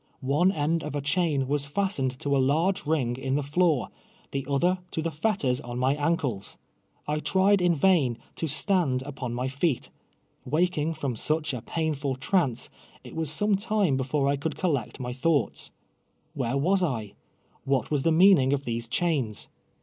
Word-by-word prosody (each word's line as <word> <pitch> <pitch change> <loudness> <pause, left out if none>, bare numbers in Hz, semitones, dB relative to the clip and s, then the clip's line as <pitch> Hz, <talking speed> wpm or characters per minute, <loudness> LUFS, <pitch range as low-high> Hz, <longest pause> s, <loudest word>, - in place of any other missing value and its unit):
One 175 +6 +4
end 160 0 0
of 150 -1 -5
a - - 0
chain 150 -3 0
was 140 0 0
fastened 145 -7 -1
to 140 -1 +1
a - - +3
lar^ 155 +9 +2
e 150 - -8
rin<j: 130 -6 0
in 135 0 -1
the 145 - 0
floor, 155 -1 +1 0.4
the 135 -1 -3
other 175 +7 +2
to 160 - -3
the 165 - -1
fetters 150 - 0
on 120 0 -6
my 130 +2 +2
ankles. 145 - -2 0.5
I 150 +1 0
ti'ied 190 +4 +3
in 175 -1 +3
vain 145 -7 +3 0.2
to 165 - -1
stand 155 -4 +2
upon 130 -4 -5
my 125 +2 -1
feet. 140 +1 -1 0.6
AVakini; 160 0 0
from 140 -6 -2
such 155 +4 0
a 125 - -4
]>ainrul 145 -4 -2
trance, 135 - +1 0.3
it - - -11
Mas 160 -2 -1
some 205 +7 +1
time 200 - +1
before 135 +2 0
I 140 0 +1
could 145 +1 -3
collect 145 - -1
my 125 -1 -4
thouglits. 140 +1 0 0.7
"Whei'e 135 -1 -1
was 185 +6 +2
1^ 115 - -2 0.5
AVhat 135 0 0
was 145 -2 +1
the 165 - +2
meaning 160 -6 +5
of 140 0 -1
these 115 0 -2
chains 135 - -1
145 Hz, 175 wpm, -27 LUFS, 130-170 Hz, 0.7 s, meaning